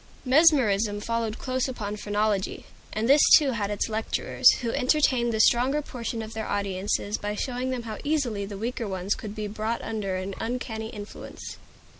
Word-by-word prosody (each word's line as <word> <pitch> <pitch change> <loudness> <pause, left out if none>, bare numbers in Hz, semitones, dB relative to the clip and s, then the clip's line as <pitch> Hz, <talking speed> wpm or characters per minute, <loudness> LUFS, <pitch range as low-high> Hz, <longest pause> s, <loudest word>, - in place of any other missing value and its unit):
Mesmerism 250 -8 +4
followed 230 0 -2
close 255 0 -1
upon 210 -5 -4
phrenology; 205 -1 -1 0.3
and 220 +2 -1
this 280 +3 +6 0.2
too 285 -3 +1
had 210 -4 -2
its 205 -1 -1
lecturers, 220 0 +2
who 235 -2 -1
entertained 255 -3 +2
the 220 - -2
stronger 250 +6 +4
portion 235 -4 -5
of 220 +1 -8
their 220 -1 -4
audiences 200 +1 -1
by 210 0 -3
showing 255 +2 -2
them 255 -2 -3
how 220 -2 -6
easily 275 -9 0
the 200 0 -6
weaker 235 +2 -3
ones 190 +1 -1
could 210 -1 -7
be 215 -1 -4
brought 215 +2 -3
under 210 -4 -3
an 185 +1 -4
uncanny 225 -2 -4
influence. 205 -1 -9
220 Hz, 170 wpm, -26 LUFS, 205-250 Hz, 0.3 s, this